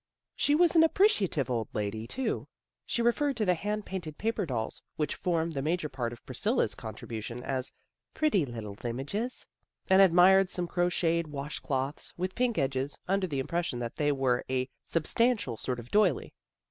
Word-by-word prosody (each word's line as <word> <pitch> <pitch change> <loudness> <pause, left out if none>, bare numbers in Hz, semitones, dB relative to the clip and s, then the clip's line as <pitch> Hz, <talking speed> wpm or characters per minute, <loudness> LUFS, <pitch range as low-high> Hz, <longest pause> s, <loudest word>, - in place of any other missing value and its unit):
She 290 - +3
was 345 +1 +4
an 325 - +8
appreciative 265 - +3
old 115 -3 -1
lady, 110 +2 -3
too. 265 - -2 0.4
She 235 - 0
referred 270 +3 +2
to 215 - +1
the 180 - +4
hand 210 +4 -3
painted 165 -6 -5
paper 220 -4 -1
dolls, 115 -5 -3
which 150 -1 -1
formed 165 -2 -1
the 135 - -2
major 155 +1 -1
part 125 -4 -3
of 120 - -12
Priscilla's - - 0
contribu 110 -2 -6
tion, 120 +2 -6
as 130 -1 -2 0.2
" - - -60
pretty 300 - +3
little 115 -6 -6
images," 140 - -3 0.5
and 190 +1 +8
admired 190 +1 +6
some 180 -1 -2
crocheted 170 -1 +1
wash 145 0 -5
cloths, 135 +1 -2
with 185 +1 -2
pink 245 -2 0
edges, 135 +1 -1
under 195 0 +1
the 145 -5 -3
impression 170 0 -1
that 120 -1 -5
they 145 -1 +2
were 135 -3 +1
a 130 0 0 0.2
substan 230 +10 +2
tial 120 - -5
sort 125 -1 -2
of 120 +1 -11
doily. 205 -9 +2
165 Hz, 180 wpm, -30 LUFS, 130-195 Hz, 0.5 s, an